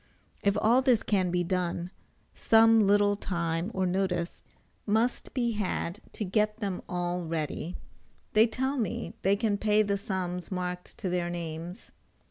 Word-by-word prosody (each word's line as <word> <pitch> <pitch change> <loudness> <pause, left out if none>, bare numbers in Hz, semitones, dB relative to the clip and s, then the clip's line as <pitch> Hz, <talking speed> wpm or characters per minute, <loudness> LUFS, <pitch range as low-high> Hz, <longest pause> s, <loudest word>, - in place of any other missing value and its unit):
If 200 0 +2
all 240 +4 +4
this 250 -4 +3
can 190 -4 +1
be 175 0 +1
done, 175 0 -2 0.4
some 225 -1 +5
little 205 0 +4
time 170 -2 -2
or 190 -3 0
notice 180 -2 -1 0.4
must 225 +4 +1
be 240 -3 +1
had 205 -3 -2
to 215 - -3
get 210 +3 +1
them 195 -4 -3
all 175 0 -1
ready. 160 +1 -3 0.6
They 220 +2 +6
tell 265 +4 -2
me 205 -4 -2
they 195 +1 +3
can 205 -1 0
pay 210 0 +3
the 200 -1 -1
sums 180 -3 -3
marked 180 -1 -4
to 185 - -3
their 175 -1 -1
names. 170 +1 -6
190 Hz, 150 wpm, -29 LUFS, 175-215 Hz, 0.6 s, They